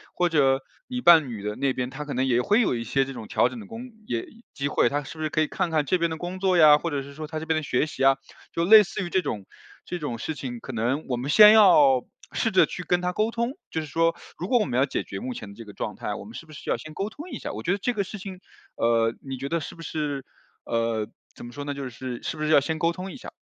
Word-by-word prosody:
或 180 - +2
者 135 -4 +3 0.3
你 250 0 -4
伴 165 - +7
侣 110 -4 -6
的 105 0 -3
那 140 +2 0
边， 125 -1 -2
他 140 +3 -6
可 145 -1 -5
能 130 +1 +1
也 125 -2 +2
会 205 - +3
有 225 - +2
一 115 - -3
些 135 +3 +1
这 135 - -7
种 115 -4 -8
调 - - +3
整 240 - -7
的 215 - -10
工 235 +3 -8 0.2
也 115 -1 -2 0.3
机 140 -1 -1
会。 130 - +2
他 145 +2 -2
是 150 - -10
不 - - -3
是 155 - 0
可 155 - -1
以 155 - +4
看 185 +2 -1
看 155 -2 +1
这 180 +5 +1
边 170 0 +1
的 160 - -4
工 175 +3 -5
作 185 -1 +2
呀， 150 -2 +8
或 170 - -2
者 140 -3 -2
是 140 +1 -11
说 155 +1 -7
他 155 0 -4
这 160 - -6
边 160 - +1
的 - - 0
学 130 0 +1
习 150 - -4
啊， 135 0 +5 0.3
就 170 - 0
类 215 +3 +9
似 195 0 -3
于 - - -5
这 190 - +2
种 105 - -4 0.4
这 180 - -4
种 145 -7 -4
事 140 +7 -4
情， 130 -4 -6
可 130 - -8
能 120 +7 -1
我 125 - -1
们 130 +4 -4
先 210 +6 +9
要 150 - +6 0.3
试 225 - 0
着 190 - +5
去 180 - -7
跟 180 0 +1
他 180 0 -1
沟 215 +4 +1
通， 235 +1 -1 0.2
就 160 - -2
是 155 - -7
说 165 +4 +1 0.2
如 180 - -3
果 245 - +3
我 210 - +1
们 125 -2 -2
要 135 - +4
解 - - -2
决 95 - -7
目 125 +2 -5
前 105 - -7
的 - - -11
这 115 - -9
个 105 -2 -12
状 - - -4
态， - - -4
我 - - -8
们 110 - -11
是 165 - -9
不 155 - -13
是 145 - -11
要 - - +3
先 155 0 -11
沟 200 +2 -2
通 310 +9 -9
一 - - -5
下？ - - -5
我 110 - -5
觉 170 - -1
得 195 - +1
这 245 +5 -1
个 205 -3 0
事 205 +2 -8
情， 190 -1 -8 0.4
呃， 115 -1 +2
你 135 -1 -6
觉 135 +2 -4
得 170 +4 0
是 150 - -8
不 165 - -11
是 145 -4 -3 0.4
呃， 115 -2 -1 0.3
怎 - - -10
么 120 - -9
说 145 +3 -7
呢？ 145 0 -3
就 140 -1 -5
是 125 0 -7
是 - - -3
不 - - -8
是 155 - 0
要 155 - +7
先 155 +3 -3
沟 165 +2 +2
通 185 +2 -7
一 - - -9
下？ - - -10
150 Hz, 335 characters per minute, -25 LUFS, 130-180 Hz, 0.4 s, 类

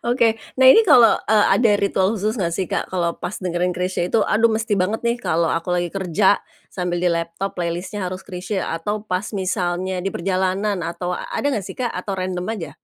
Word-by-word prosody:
Oke, 240 -1 +3 0.3
nah 260 - +5
ini 450 - +7
kalo, 245 - +6
eee, 210 0 +4
ada 230 -3 +4
ritual 200 +1 +1
khusus 215 +3 -2
nggak 170 -3 -1
sih, 190 - -1
Kak, - - -1
kalo 170 -2 -1
pas 205 - -5
dengerin 180 0 -1
Chrisye 180 -1 -1
itu, 220 +4 +2
"Aduh, 225 +3 +3
mesti 220 -2 0
banget 205 +6 -1
nih 235 +1 0
kalo 165 -6 0
aku 175 +2 -1
lagi 175 -1 -1
kerja 195 +1 +2 0.3
sambil 180 -1 -3
di 180 - +3
laptop 170 +3 -3
playlist-nya 180 +3 -3
harus 185 +1 -5
Chrisye," 190 +1 -4
atau 205 +6 -3
pas 185 0 -2
misalnya 185 -1 -1
di 195 +2 -2
perjalanan 190 +2 0
atau 175 +1 -4
ada 285 - -4
nggak 210 -9 -2
sih, - - -7
Kak, 245 -2 -2
atau 195 +2 -4
random 185 -1 -3
aja? 165 -8 -6
185 Hz, 200 wpm, -21 LUFS, 180-210 Hz, 0.3 s, ini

